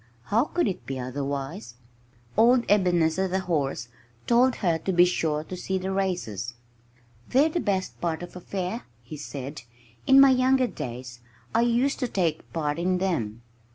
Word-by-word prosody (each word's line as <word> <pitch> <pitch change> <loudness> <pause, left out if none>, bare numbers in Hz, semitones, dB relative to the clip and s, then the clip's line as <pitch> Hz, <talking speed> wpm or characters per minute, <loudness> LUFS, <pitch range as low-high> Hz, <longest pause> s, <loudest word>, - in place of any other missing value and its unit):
How 225 - +2
could 345 -1 0
it 190 - -4
be 135 -1 -3
otherwise? 135 - -4 0.6
Old 240 +2 +5
Ebenezer, 180 -2 +3
the 190 +1 -1
horse, 145 -9 -1 0.4
told 245 +2 +4
her 170 -5 0
to 190 - -2
be 175 0 +6
sure 160 -4 0
to 185 - -7
see 190 +1 -2
the 190 +1 -3
races. 150 - -2 0.7
"They're 280 +5 +4
the 340 - -1
best 195 - -2
part 170 -1 -2
of 175 - -10
a 180 - -8
fair," 190 +5 -4 0.2
he 120 - -8
said. 140 -1 -7 0.5
"In 270 0 +8
my 275 -1 +8
younger 260 0 +3
days 125 - -7 0.3
I 230 - +3
used 240 +3 +2
to 255 - 0
take 170 -8 -1
part 150 -1 -2
in 180 +1 +1
them." 120 - -2
180 Hz, 165 wpm, -26 LUFS, 145-225 Hz, 0.7 s, In